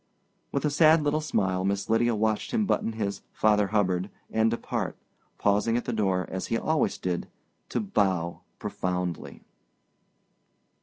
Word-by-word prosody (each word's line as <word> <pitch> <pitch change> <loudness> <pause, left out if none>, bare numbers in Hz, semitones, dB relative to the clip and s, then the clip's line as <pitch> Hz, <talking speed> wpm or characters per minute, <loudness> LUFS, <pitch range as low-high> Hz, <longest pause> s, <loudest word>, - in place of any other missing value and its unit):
With 140 - -1
a 150 - +2
sad 155 +1 +5
little 150 +1 +1
smile 95 -11 0
Miss 100 +1 -1
Lydia 115 +1 +3
watched 110 0 0
him 220 -2 +2
button 115 - 0
his 100 -3 -3
"Father 105 -1 +3
Hubbard" 95 -2 +1 0.2
and 110 0 +3
depart, 115 - -3 0.4
pausing 105 +3 +2
at 120 - -3
the 120 - -2
door, 95 -4 +1
as 95 0 -4
he 115 - 0
always 155 +5 +1
did, 90 -1 -2 0.4
to 120 - -1
bow 95 -5 0 0.2
profoundly. 90 -2 -3
105 Hz, 145 wpm, -27 LUFS, 95-120 Hz, 0.4 s, sad